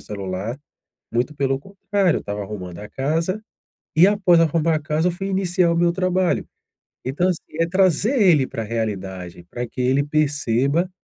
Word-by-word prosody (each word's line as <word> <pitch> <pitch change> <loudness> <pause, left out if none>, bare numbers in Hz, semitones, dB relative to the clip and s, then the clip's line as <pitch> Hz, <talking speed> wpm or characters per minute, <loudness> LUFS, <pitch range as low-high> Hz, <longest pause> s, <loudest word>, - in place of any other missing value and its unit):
celular. 100 +4 -5 0.5
Muito 120 +5 -1
pelo 135 -1 0
contrário. 195 +2 0
Eu - - -9
estava 105 0 -4
arrumando 95 -4 -7
a 105 - -8
casa, 165 +9 -1 0.5
e 170 +5 +7
após 190 -5 +4
arrumar 165 0 +2
a - - +2
casa, 155 +2 0
eu - - -1
fui 195 +3 -4
iniciar 185 -2 +2
o 170 - +1
meu 170 0 +3
trabalho." 185 0 +1 0.6
Então, 145 +8 0
assim, 180 -3 -1 0.2
é 165 - +3
trazer 190 - +2
ele 160 -9 +5
para 115 - -5
a - - -5
realidade, 95 -6 -4
pra 120 0 -4
que 125 - -8
ele 130 +3 +3
perceba 145 +2 +1
155 Hz, 175 wpm, -22 LUFS, 115-180 Hz, 0.6 s, e